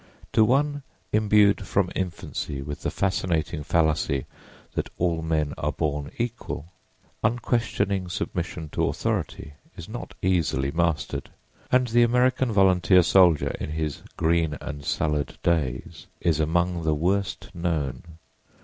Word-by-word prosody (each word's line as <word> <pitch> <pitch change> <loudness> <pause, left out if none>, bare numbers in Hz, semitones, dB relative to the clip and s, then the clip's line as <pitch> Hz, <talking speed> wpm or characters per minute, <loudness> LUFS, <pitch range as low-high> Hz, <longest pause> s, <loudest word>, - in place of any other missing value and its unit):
To 110 - +6
one 145 +5 +2 0.3
imbued 105 -2 +4
from 95 -3 +1
infancy 85 -6 -4
with 75 +1 -6
the - - -1
fascinating 85 -4 -1
fallacy 75 -4 +1 0.5
that - - -2
all 85 -2 +1
men 80 -2 0
are - - 0
born 75 -1 -2
equal, 115 - -4 0.5
unquestioning 110 -5 0
submission 90 -3 -4
to - - 0
authority 70 - -2 0.2
is 85 - -8
not 120 +3 -7
easily 80 -7 +1
mastered, 85 -1 -1 0.4
and 125 0 +4
the 120 +2 +4
American 125 +1 +3
volunteer 95 -2 +5
soldier 85 -3 +4
in 75 - -4
his 80 -2 -3 0.2
"green 80 -2 +1
and 70 -1 -6
salad 75 -2 -1
days" 80 -7 -1
is 85 -3 +1
among 85 +3 +1
the 80 -1 +1
worst 95 +5 -1
known. 80 -6 -2
85 Hz, 125 wpm, -25 LUFS, 75-100 Hz, 0.5 s, To